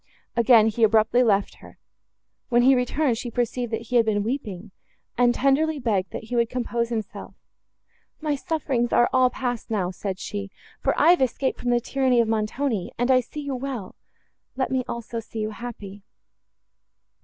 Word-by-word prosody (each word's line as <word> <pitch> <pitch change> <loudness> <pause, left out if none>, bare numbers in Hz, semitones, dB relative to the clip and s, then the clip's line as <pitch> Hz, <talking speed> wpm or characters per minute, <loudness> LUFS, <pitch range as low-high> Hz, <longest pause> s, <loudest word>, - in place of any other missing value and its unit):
Again 235 -1 +6
he 225 +1 -2
abruptly 220 +2 +4
left 205 -5 +1
her. - - -15 0.7
When 240 -1 +4
he 265 +2 +6
returned, 250 0 +1
she 245 - -5
perceived 240 0 -2
that 225 0 -2
he 250 - +3
had 230 - +4
been 205 -2 +1
weeping, 215 -5 -4 0.4
and 245 0 +4
tenderly 295 +3 +2
begged, 210 -8 -1
that - - -7
he 245 +3 -5
would 235 -1 +2
compose 235 -2 -2
himself. 220 -4 -5 0.8
"My 305 -2 -1
sufferings 270 -5 -1
are 240 - +4
all 255 -1 +5
passed 245 -2 -4
now," 190 -5 -1
said 190 0 -5
she, 200 0 -5 0.3
"for - - 0
I 340 - +6
have 355 - +3
escaped 260 +1 0
from 245 - -2
the 240 0 +3
tyranny 255 0 +1
of 230 - +3
Montoni, 220 -1 -1
and 245 +2 +1
I 255 - +6
see 255 +5 -7
you 285 -1 -4
well—let 255 +1 -7
me 260 -1 +1
also 235 0 -5
see 225 0 -10
you 215 0 -2
happy." 210 -3 -8
240 Hz, 175 wpm, -24 LUFS, 220-255 Hz, 0.8 s, Again